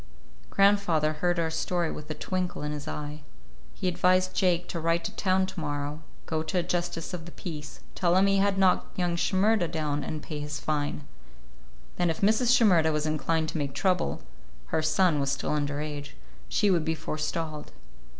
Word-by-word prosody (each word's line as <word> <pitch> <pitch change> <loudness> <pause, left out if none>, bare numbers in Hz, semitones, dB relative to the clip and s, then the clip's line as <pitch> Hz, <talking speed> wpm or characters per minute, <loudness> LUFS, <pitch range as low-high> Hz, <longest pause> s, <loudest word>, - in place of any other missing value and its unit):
Grandfather 195 -6 +3
heard 175 +3 0
our 165 -1 0
story 170 +1 -1
with 150 0 -8
a 155 - -3
twinkle 180 -2 -3
in 150 - -2
his 150 -1 -6
eye. 150 0 -5 0.5
He - - -2
advised 185 +1 +3
Jake 180 -2 +2
to 170 - -3
ride 165 +1 +1
to - - -4
town 190 -1 +2
to 185 - -6
morrow, 145 0 -3 0.2
go 160 -1 -1
to 160 +4 -2
a 175 - +2
justice 175 -1 -2
of 170 -2 -5
the - - -9
peace, 150 -4 -7
tell 175 -2 +2
him 190 - +5
he 195 0 +3
had 195 0 +2
knocked 190 -1 +2
young 175 -2 +1
Shimerda 190 +2 +2
down, 150 -3 -2
and 155 -1 -5
pay 150 -2 -5
his 150 +1 -4
fine. 145 -1 -2 0.9
Then 175 - +2
if 160 - -2
Mrs. 220 +4 +4
Shimerda 175 -9 +5
was 150 0 0
inclined 155 +1 0
to 160 - -3
make 140 -2 -3
trouble—her - - -2
son 155 0 +3
was 140 -1 0
still 135 - -2
under 145 -1 -1
age—she 140 - -3
would 170 -3 +2
be 160 +1 0
forestalled. 155 0 -4
160 Hz, 180 wpm, -28 LUFS, 150-180 Hz, 0.9 s, him